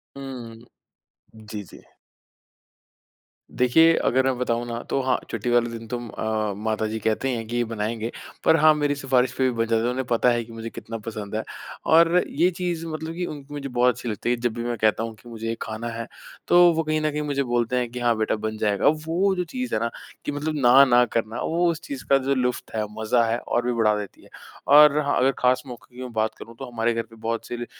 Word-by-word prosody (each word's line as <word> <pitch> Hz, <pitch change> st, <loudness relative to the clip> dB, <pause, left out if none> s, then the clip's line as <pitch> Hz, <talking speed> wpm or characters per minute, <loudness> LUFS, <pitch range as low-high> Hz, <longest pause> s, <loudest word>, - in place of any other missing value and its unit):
हुँ, 130 Hz, -4 st, -8 dB, 0.8 s
जी, 105 Hz, -1 st, -8 dB
जी। -, -, -13 dB, 1.8 s
देखिए, 160 Hz, +7 st, +5 dB
अगर 130 Hz, +1 st, +2 dB
मैं 130 Hz, -2 st, +1 dB
बताऊँ 120 Hz, -1 st, -1 dB
ना, 115 Hz, 0 st, -4 dB
तो 135 Hz, -, +1 dB
हाँ, 130 Hz, 0 st, +1 dB
छुट्टी 125 Hz, -, -3 dB
वाले 120 Hz, -1 st, +3 dB
दिन 115 Hz, -1 st, -8 dB
तुम 120 Hz, 0 st, -5 dB
अ, 110 Hz, -2 st, -2 dB
माता 110 Hz, +1 st, -1 dB
जी 110 Hz, +1 st, -4 dB
कहती 110 Hz, +5 st, 0 dB
हैं 115 Hz, -1 st, -3 dB
कि 120 Hz, -, -4 dB
ये 120 Hz, -, +2 dB
बनाएँगे, 110 Hz, +1 st, -3 dB, 0.3 s
पर 160 Hz, -, +6 dB
हाँ, 155 Hz, 0 st, +7 dB
मेरी 145 Hz, -1 st, 0 dB
सिफारिश 130 Hz, -2 st, +1 dB
पे 130 Hz, -, +1 dB
भी 130 Hz, -, +3 dB
बन 115 Hz, -, +2 dB
जाता 115 Hz, 0 st, +1 dB
है, 120 Hz, -, +1 dB
उन्हें 130 Hz, +1 st, -2 dB
पता 120 Hz, 0 st, +3 dB
है 120 Hz, -1 st, +1 dB
कि 115 Hz, 0 st, -13 dB
मुझे 115 Hz, 0 st, -6 dB
कितना 115 Hz, 0 st, -7 dB
पसंद 110 Hz, -1 st, -6 dB
है। 110 Hz, -, -1 dB, 0.5 s
और 170 Hz, +2 st, +6 dB
ये 170 Hz, +5 st, +2 dB
चीज़ 175 Hz, -2 st, -2 dB
मतलब 160 Hz, +1 st, -5 dB
कि 180 Hz, -, -2 dB
उनकी 145 Hz, -3 st, -8 dB
मुझे 140 Hz, -1 st, -5 dB
बहुत 125 Hz, 0 st, +3 dB
अच्छी 120 Hz, -1 st, -5 dB
लगती 105 Hz, +2 st, -3 dB
है, 120 Hz, -, +3 dB
जब 120 Hz, -1 st, -2 dB
भी 115 Hz, 0 st, -4 dB
मैं 120 Hz, -1 st, -2 dB
कहता 110 Hz, +1 st, +2 dB
हूँ, 115 Hz, 0 st, -5 dB
कि 120 Hz, -, -16 dB
मुझे 115 Hz, -1 st, -6 dB
ये 115 Hz, -, -1 dB
खाना 110 Hz, +2 st, -5 dB
है, 115 Hz, 0 st, -5 dB, 0.4 s
तो 175 Hz, 0 st, +6 dB
वो 165 Hz, 0 st, 0 dB
कहीं 155 Hz, 0 st, 0 dB
न 155 Hz, -1 st, 0 dB
कहीं 150 Hz, +1 st, -2 dB
मुझे 140 Hz, -2 st, -1 dB
बोलते 120 Hz, 0 st, 0 dB
हैं, 125 Hz, -1 st, -1 dB
कि 125 Hz, -, -6 dB
हाँ, 120 Hz, -1 st, +2 dB
बेटा 110 Hz, 0 st, 0 dB
बन 110 Hz, 0 st, -4 dB
जाएगा। 105 Hz, -2 st, +1 dB, 0.2 s
वो 190 Hz, +4 st, +2 dB
जो 180 Hz, -, -1 dB
चीज़ 255 Hz, +7 st, -5 dB
है -, -, +1 dB
ना, 115 Hz, -, 0 dB, 0.4 s
कि -, -, -1 dB
मतलब 150 Hz, +2 st, -3 dB
ना 130 Hz, +3 st, +8 dB
ना 125 Hz, -2 st, +5 dB
करना, 115 Hz, 0 st, -1 dB
वो 170 Hz, +1 st, +1 dB
उस 165 Hz, +1 st, -6 dB
चीज़ 135 Hz, -2 st, -7 dB
का 135 Hz, -, +6 dB
जो 135 Hz, +1 st, 0 dB
लुफ्त 125 Hz, -2 st, -2 dB
है, 110 Hz, -, 0 dB, 0.2 s
मज़ा 115 Hz, +2 st, +2 dB
है 120 Hz, -, +1 dB
और 120 Hz, 0 st, -2 dB
भी 125 Hz, -, +1 dB
बढ़ा 110 Hz, -2 st, +3 dB
देती 100 Hz, -, -9 dB
है। -, -, -18 dB, 0.4 s
और 150 Hz, +1 st, +7 dB
हाँ, 145 Hz, -1 st, 0 dB
अगर 130 Hz, +1 st, +4 dB
ख़ास 125 Hz, 0 st, +2 dB
मौकों 120 Hz, 0 st, -11 dB
की 125 Hz, -, -8 dB
मैं 125 Hz, -1 st, -6 dB
बात 110 Hz, 0 st, 0 dB
करूँ, 115 Hz, 0 st, -11 dB
तो 135 Hz, -, -5 dB
हमारे 115 Hz, 0 st, 0 dB
घर 115 Hz, -, -1 dB
पे -, -, -12 dB
बहुत 115 Hz, +1 st, -4 dB
से 120 Hz, -, -5 dB
ल 120 Hz, -, -4 dB
120 Hz, 245 wpm, -24 LUFS, 115-140 Hz, 1.8 s, ना